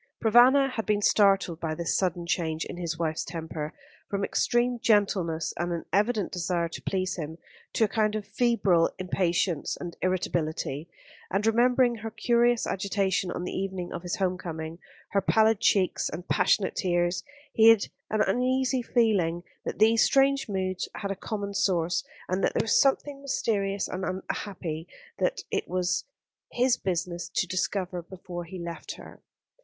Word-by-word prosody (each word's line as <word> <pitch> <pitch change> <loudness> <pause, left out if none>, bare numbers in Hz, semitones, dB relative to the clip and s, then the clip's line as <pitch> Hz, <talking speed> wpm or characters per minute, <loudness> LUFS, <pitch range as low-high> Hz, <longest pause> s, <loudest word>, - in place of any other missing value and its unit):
Provana 250 +5 +6
had 225 -3 -4
been 210 -1 +1
startled 195 -6 +3
by 160 -2 -2
this 170 +1 -1
sudden 175 -2 0
change 160 -2 -1
in - - -7
his 170 -2 -3
wife's 160 -2 -1
temper, 160 -2 -5 0.4
from 200 -1 -1
extreme 240 +3 +1
gentleness 190 -8 +1
and 175 +1 -1
an 170 -1 -3
evident 210 -1 +1
desire 175 -1 -1
to - - -8
please 185 -1 -2
him, 160 -1 -5 0.4
to - - +2
a - - +4
kind 215 0 +1
of 215 -2 -3
febrile 200 -6 +2
impatience 180 -3 0
and 175 -1 -6
irritability; 170 -4 -1 0.4
and 200 +2 0
remembering 240 +2 +3
her 225 +1 -5
curious 235 +1 +2
agitation 190 -1 0
on 175 - -4
the - - -4
evening 190 -2 -4
of - - -5
his 175 -1 -3
home 185 -2 -1
coming, 160 -1 -6 0.3
her 200 - +2
pallid 220 +2 +3
cheeks 195 -4 +2
and 175 +3 -7
passionate 195 - +2
tears, 175 -1 0 0.3
he 225 0 +7
had 225 -3 +6 0.3
an 215 0 +1
uneasy 255 +2 +1
feeling 200 -9 +1 0.2
that - - -3
these 220 +2 +5
strange 275 -2 +3
moods 185 -2 -2
had 200 -1 -3
a - - -2
common 200 0 -4
source, 180 -3 +1 0.2
and 185 +2 -1
that - - +1
there - - +2
was 225 - +4
something 275 +1 +1
mysterious 205 -7 -1
and 185 +1 -5
unhappy 185 -3 -4 0.3
that - - 0
it - - -1
was 180 0 0 0.5
his 250 0 +3
business 175 -1 -3
to - - 0
discover 185 0 -2
before 175 0 -8
he 185 +3 -8
left 170 -1 -6
her. - - -13
190 Hz, 160 wpm, -27 LUFS, 175-220 Hz, 0.5 s, he